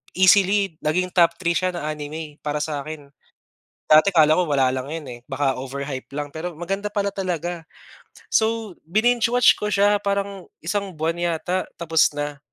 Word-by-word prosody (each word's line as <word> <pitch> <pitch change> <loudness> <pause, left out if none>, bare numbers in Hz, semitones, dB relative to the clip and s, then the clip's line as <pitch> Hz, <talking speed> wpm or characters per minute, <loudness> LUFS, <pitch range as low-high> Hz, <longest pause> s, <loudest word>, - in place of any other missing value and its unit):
easily 195 0 +4
naging 180 +4 0
top 170 -2 +4
3 170 -2 +1
siya 185 +1 +1
na 155 -3 -4
anime 150 0 -7
para 150 0 -2
sakin. 150 -1 -6 0.8
Dati 155 +5 +7
kala 155 -1 +5
ko 180 - +2
wala 135 -4 +2
lang 130 0 -3
iyon 160 -1 -5
eh, 120 - -8
baka 135 0 0
overhype 135 0 -5
lang, 145 0 -4
pero 170 +2 -5
maganda 195 +4 -3
pala 200 -1 0
talaga. 175 -3 -3 0.7
So 220 - +1
bininge-watch 240 +5 +3
ko 210 0 -2
siya, 205 +1 +4
parang 200 -1 -2 0.2
isang 195 +2 -2
buwan 160 +2 -2
yata 175 +2 -1
tapos 160 -1 +3
na. 145 0 -4
170 Hz, 160 wpm, -22 LUFS, 150-195 Hz, 0.8 s, Dati